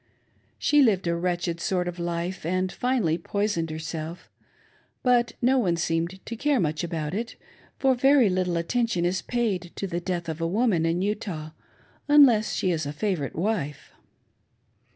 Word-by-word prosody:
She 295 0 +4
lived 205 -8 +3
a 170 0 +1
wretched 175 -1 -1
sort 180 -2 0
of 175 0 -5
life, 170 +2 -3
and, 185 +3 -1
finally, 230 -11 0
poisoned 200 -2 -1
herself; 160 +1 -6 0.7
but 240 -2 +3
no 260 +2 +4
one 180 -8 +1
seemed 165 +3 -2
to 230 - -5
care 285 +2 +1
much 155 -2 -1
about 160 -2 -3
it, 225 +3 -4 0.4
for 270 -1 +3
very 265 -1 +5
little 180 -2 0
attention 185 0 0
is 180 +1 0
paid 200 -8 -2
to - - -3
the 175 -2 -2
death 175 -1 -3
of 160 0 -4
a 165 - +1
woman 190 -4 +2
in 170 +3 0
Utah, 195 -7 -3 0.6
unless 270 -8 +6
she 185 - 0
is 160 -3 -1
a - - -3
favorite 175 -5 -2
wife. 165 -7 -2
180 Hz, 160 wpm, -26 LUFS, 165-225 Hz, 0.7 s, unless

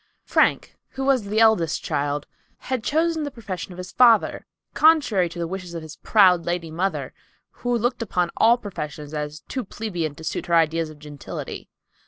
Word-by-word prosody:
Frank, - - +1
who 265 0 -4
was 265 -6 +2
the 210 +2 0
eldest 220 -8 +3
child, 145 +1 -1 0.3
had 255 -3 -3
chosen 320 +3 +1
the 295 - -2
profession 200 -8 -7
of 175 - -10
his 180 0 -7
father, 235 -4 +4 0.3
contrary 250 - +4
to 170 - -10
the 170 - -2
wishes 180 -1 -6
of 165 - -5
his 155 -1 -10
proud 185 -5 +4
lady 170 -2 -3
mother, 160 -5 -2 0.4
who 245 0 -1
looked 245 +2 -1
upon 180 -5 -1
all 235 +2 +5
professions 150 -9 -7
as 150 +1 -4
too 260 - -5
plebeian 175 -8 -4
to 160 - -12
suit - - -3
her 170 - +2
ideas 165 0 +2
of 155 - -12
gentility. 145 -2 -8
180 Hz, 180 wpm, -23 LUFS, 160-230 Hz, 0.4 s, all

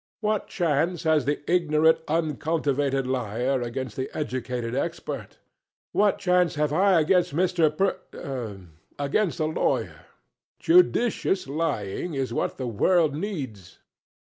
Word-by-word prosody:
What 215 -1 -1
chance 170 0 0
has 155 -4 +2
the 145 +1 -1
ignorant 160 -2 +3
uncultivated 145 -3 0
liar 125 +1 -1
against 120 -1 -4
the 130 - -3
educated 125 -4 -3
expert? 165 +6 -4 0.5
What 205 -1 +3
chance 180 -2 +2
have 150 -1 0
I 185 +1 +4
against 170 -1 +2
Mr. 175 -2 +3
Per 135 - -3 0.4
against 165 +6 0
a 155 - +1
lawyer? 155 +1 -1 0.5
Judicious 245 - +3
lying 145 - -2
is 130 -3 -2
what - - -2
the 130 - -4
world 155 - +2
needs. 140 - -5
150 Hz, 120 wpm, -25 LUFS, 130-175 Hz, 0.5 s, I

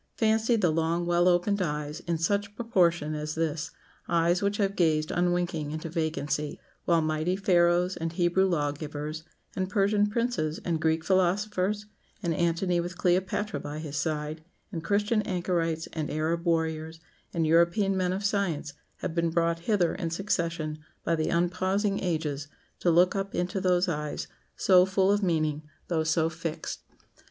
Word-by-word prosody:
Fancy 220 +1 +2
the 185 -7 +2
long 165 +2 0
well 175 +1 +3
opened 180 +3 +2
eyes, 150 -2 -2
in 170 -1 -2
such 200 +5 0
proportion 175 -9 +1
as 150 0 -4
this 160 -1 -1 0.4
eyes 170 +1 +2
which 200 0 0
have 200 -1 0
gazed 155 -3 +2
unwinking 175 -3 0
into 155 +2 -5
vacancy, 155 -2 -2 0.3
while 170 -2 +3
mighty 155 +3 0
Pharaohs, 180 -1 +3
and 165 0 -2
Hebrew 175 +2 +2
law 150 -5 +1
givers, 150 +1 -6 0.3
and 185 0 -1
Persian 205 +1 +2
princes, 210 -8 -1
and 165 -3 0
Greek 160 0 +1
philosophers, 195 +2 +1 0.4
and 170 -2 +1
Antony 170 +2 +1
with 175 +1 -4
Cleopatra 185 +4 0
by 145 +1 -6
his 155 -2 -6
side, 150 +1 -2 0.3
and 165 -4 -5
Christian 210 +3 +1
anchorites, 175 -4 -1
and 155 -2 -3
Arab 160 +3 -1
warriors, 160 -1 -1 0.3
and 165 -2 0
European 170 +5 +3
men 185 -1 +1
of 195 +2 -2
science, 180 -8 -1 0.3
have - - -3
been 170 0 +1
brought 170 0 +1
hither 190 -6 +3
in 165 - -3
succession 165 -4 -2 0.2
by 170 - +1
the 155 -1 -1
unpausing 185 +4 +1
ages 155 -5 -2 0.3
to 175 - +2
look 175 +3 +4
up 195 0 -3
into 180 +2 -1
those 180 0 +2
eyes 150 -3 -3 0.3
so 185 -2 +5
full 190 +1 +2
of 205 +1 +2
meaning, 155 -5 0 0.3
though 165 -3 +1
so 160 0 +2
fixed!" 165 -1 -5
170 Hz, 160 wpm, -28 LUFS, 160-190 Hz, 0.4 s, so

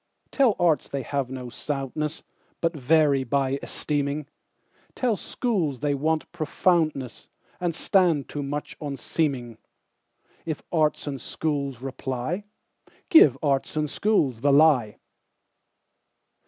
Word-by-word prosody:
Tell 255 -7 +3
arts 170 -4 +2
they 140 -1 -3
have 140 -2 -2
no 130 -2 -6
soundness, 150 +3 -3 0.4
But 165 0 0
vary 145 0 +3
by 135 +1 0
esteeming; 145 0 -2 0.7
Tell 245 -4 +1
schools 185 - -1
they 145 -1 +1
want 155 +3 -1
profoundness, 155 -5 0 0.3
And 175 -3 -1
stand 170 -8 +2
too 145 - -5
much 145 +1 -4
on 145 -2 -4
seeming:If 135 +3 -5
arts 155 -3 +1
and 140 -4 -4
schools 140 -5 -3
reply, 135 +7 -3 0.6
Give 145 - +7
arts 140 +1 0
and 155 0 +1
schools 145 - +1
the 145 +1 +3
lie. 140 -7 +4
145 Hz, 115 wpm, -25 LUFS, 135-160 Hz, 0.7 s, Give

